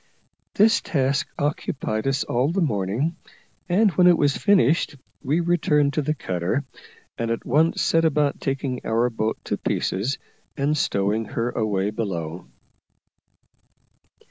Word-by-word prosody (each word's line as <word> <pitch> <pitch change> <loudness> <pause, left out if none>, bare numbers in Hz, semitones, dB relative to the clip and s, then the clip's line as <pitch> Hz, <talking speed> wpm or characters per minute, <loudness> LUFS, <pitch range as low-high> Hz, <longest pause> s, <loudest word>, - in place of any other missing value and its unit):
This 220 +2 +4
task 135 -3 0
occupied 135 -6 -2
us 135 0 +1
all 125 +6 0
the 190 - -1
morning, 130 - -1 0.5
and 200 +4 +4
when 180 +2 +4
it 175 -2 +6
was 145 -2 +2
finished 165 - +2 0.3
we 150 +6 0
returned 160 -4 +2
to 155 - 0
the 150 +2 -1
cutter, 95 - -2 0.5
and 115 0 -1
at 115 - -2
once 155 +6 +2
set 165 0 +3
about 150 -3 +1
taking 135 -2 -2
our 115 +2 +1
boat 110 -1 -1
to - - -2
pieces 110 +9 -1 0.4
and 145 +2 +1
stowing 105 -4 0
her 115 +3 -2
away 105 -3 -1
below. 85 -6 -4
135 Hz, 135 wpm, -23 LUFS, 110-155 Hz, 0.5 s, it